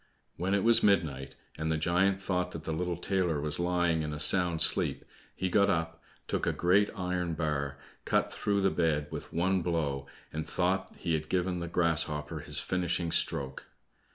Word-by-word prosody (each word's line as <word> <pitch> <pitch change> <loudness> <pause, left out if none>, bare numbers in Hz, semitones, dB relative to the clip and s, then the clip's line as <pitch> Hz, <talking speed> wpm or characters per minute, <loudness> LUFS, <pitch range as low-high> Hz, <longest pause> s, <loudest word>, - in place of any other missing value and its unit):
When 95 +3 0
it 100 - +1
was 115 0 +5
midnight, 80 -10 +1 0.2
and 80 0 -1
the 80 - +1
giant 90 +5 +2
thought 90 -2 -2
that 80 - -7
the 80 - -4
little 85 +2 -2
tailor 90 -4 0
was 75 +1 -3
lying 85 -2 +1
in 75 -1 -3
a 75 - -5
sound 85 +2 +3
sleep, - - +3 0.3
he 95 - -1
got 100 +2 +3
up, 80 -2 -1 0.3
took - - -1
a - - +2
great 95 +4 +3
iron 90 -3 -2
bar, 70 -3 -2 0.3
cut - - +1
through 100 -1 0
the 95 - +3
bed 80 -4 +1
with 80 - -7
one 95 +3 +1
blow, 75 -5 -2 0.3
and 80 0 -4
thought 95 +1 -1
he 85 - -2
had 75 -1 -2
given 90 -1 0
the 85 - -4
grasshopper 80 -2 0
his 75 0 -4
finishing 85 0 -1
stroke. 65 -4 -1
85 Hz, 180 wpm, -30 LUFS, 80-90 Hz, 0.3 s, was